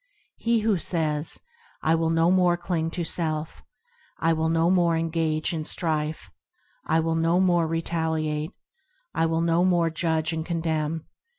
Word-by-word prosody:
He 230 -1 +1
who 210 -4 +2
says,– 155 -3 -1 0.4
I 160 - +3
will 165 0 +1
no 165 +1 +3
more 180 -2 +3
cling 175 -2 -2
to 175 +1 -3
self; 155 -2 -2 0.6
I 165 0 +2
will 160 0 0
no 165 +1 +3
more 170 -3 +3
engage 160 0 0
in 160 -2 -2
strife; 155 -1 -2 0.5
I 160 - +2
will 165 0 0
no 165 +2 +2
more 175 -3 +3
retaliate; 160 -1 -1 0.6
I 165 - +2
will 165 0 0
no 170 +1 +2
more 175 -3 +2
judge 160 -1 0
and 160 0 -2
condemn. 160 -2 -2
165 Hz, 155 wpm, -25 LUFS, 160-170 Hz, 0.6 s, I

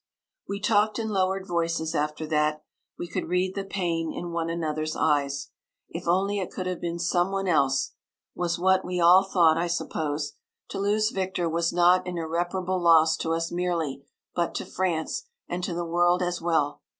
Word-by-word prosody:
We 200 - -3
talked 210 0 +2
in 225 -1 -2
lowered 190 -1 0
voices 165 -2 -1
after 150 +1 -1
that; 150 0 0 0.3
we 175 - -5
could 170 - -4
read 180 +1 +1
the 195 - -3
pain 170 -4 -2
in 175 -1 -5
one 165 -1 -2
another's 155 -2 -2
eyes. 140 -2 0 0.4
If - - -7
only 195 +4 +2
it 185 - -3
could 185 - -5
have 185 -1 -3
been 170 0 -3
some 175 +2 +1
one 195 0 -1
else, 140 -6 +2 0.4
was 175 -1 -1
what 190 +1 +3
we 180 0 -3
all 175 +3 +7
thought, 170 -4 +3
I 175 - 0
suppose. 150 -3 -2 0.4
To - - -4
lose 210 +2 +1
Victor 190 -4 -1
was 165 +1 0
not 180 +1 +4
an 180 -1 -3
irreparable 175 +3 -1
loss 160 -2 +5
to 165 - -1
us 165 0 -2
merely, 170 -6 -2 0.3
but 170 -1 -1
to - - -3
France, 185 - -2 0.2
and 180 +1 -4
to 175 - -3
the 175 0 -2
world 175 +2 +2
as 175 -1 -2
well. 160 -4 0
175 Hz, 185 wpm, -26 LUFS, 165-185 Hz, 0.4 s, all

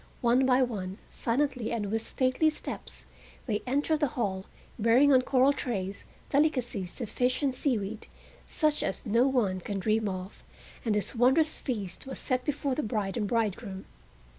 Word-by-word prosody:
One 250 +2 +4
by 260 0 +5
one, 195 -6 -4
silently 250 -1 -1
and 210 -4 -2
with 225 0 0
stately 260 +4 +2
steps, 310 - -7 0.4
they 210 -4 -1
entered 290 +4 +1
the 295 - +2
hall, 190 -5 -1 0.3
bearing 245 +6 +5
on 255 - +6
coral 260 +2 +4
trays 200 -8 -4 0.3
delicacies 250 - 0
of 235 - -2
fish 250 +6 0
and 270 -2 +2
seaweed, 225 -6 -1 0.4
such 305 -2 +1
as - - -3
no 230 +4 +3
one 215 -9 +1
can 200 +2 -4
dream 215 +2 +1
of, 185 +1 -6 0.4
and 220 -3 +1
this 210 - -1
wondrous 265 +6 +3
feast 210 - -4
was 265 - -5
set 255 -2 0
before 285 -1 -1
the 300 - -1
bride 210 -5 -2
and 215 -4 -1
bridegroom. 210 -3 -2
240 Hz, 165 wpm, -29 LUFS, 205-265 Hz, 0.4 s, on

